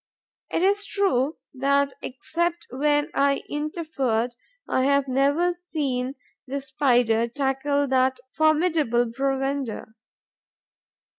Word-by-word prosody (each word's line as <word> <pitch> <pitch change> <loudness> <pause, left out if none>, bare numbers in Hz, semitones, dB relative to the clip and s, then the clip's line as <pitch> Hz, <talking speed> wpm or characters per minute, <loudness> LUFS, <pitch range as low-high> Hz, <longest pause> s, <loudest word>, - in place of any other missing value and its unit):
It 335 - 0
is 405 +1 +3
true 325 -9 0 0.2
that, 280 +1 +1
except 340 +6 -2
when 295 +4 +1
I 280 0 +2
interfered, 290 -6 -2 0.3
I 260 - +1
have 280 0 +3
never 285 +7 +2
seen 280 -7 -3 0.3
the 275 +2 -2
Spider 245 -4 +2
tackle 280 +2 0
that 260 0 +2
formidable 310 -7 +2
provender. 270 -3 -2
275 Hz, 95 wpm, -25 LUFS, 260-310 Hz, 0.3 s, is